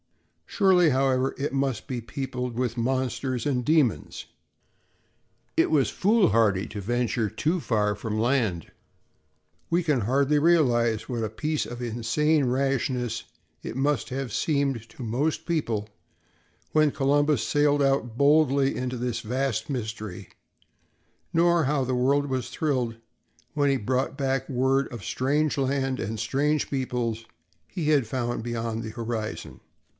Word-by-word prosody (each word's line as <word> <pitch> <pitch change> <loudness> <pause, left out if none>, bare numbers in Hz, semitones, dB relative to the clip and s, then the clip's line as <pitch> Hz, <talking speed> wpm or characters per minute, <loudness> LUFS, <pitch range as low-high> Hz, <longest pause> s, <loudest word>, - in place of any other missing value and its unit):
Surely, 185 -5 +4
however, 130 -1 +1
it 140 0 -2
must 135 -2 -1
be 125 -3 -3
peopled 125 +1 -4
with 125 -2 -1
monsters 130 0 -1
and 130 -4 0
demons. 150 -5 +1 1.3
It - - +3
was 145 -4 +3
foolhardy 115 - +3
to 105 - -6
venture 120 0 0
too 160 - -1
far 105 -5 +1
from 110 +1 -3
land. 115 - 0 1.0
We 170 +1 +2
can 150 -7 +1
hardly 140 +6 +2
realize 120 -9 +3
what 120 -3 -2
a 110 - -1
piece 150 +8 -2
of 120 +1 -7
insane 125 +6 +1
rashness 125 -2 -1 0.4
it 120 - -5
must 135 -4 0
have 130 -3 -4
seemed 140 -7 0
to 125 - -10
most 145 +8 -1
people 120 -11 -1 0.9
when 155 -1 +4
Columbus 145 -4 +2
sailed 145 +1 +3
out 135 -4 +1
boldly 140 -1 +4
into 125 0 -3
this 125 0 -2
vast 125 0 -2
mystery, 110 -7 -5 1.0
nor 170 0 +3
how 140 -1 +1
the 130 0 -1
world 140 +3 +2
was 130 -2 -3
thrilled 125 -7 -1 0.6
when 145 -1 +2
he 135 - +2
brought 130 +4 -1
back 135 -1 -1
word 135 +1 +1
of 120 -5 -8
strange 145 +4 0
lands 135 -1 0
and 110 +2 -4
strange 150 +6 0
peoples 120 -4 -2 0.4
he 155 -4 -3
had 140 -5 +3
found 120 -1 -2
beyond 115 -1 -3
the 110 - -5
horizon. 110 -1 -5
130 Hz, 135 wpm, -26 LUFS, 115-145 Hz, 1.3 s, Surely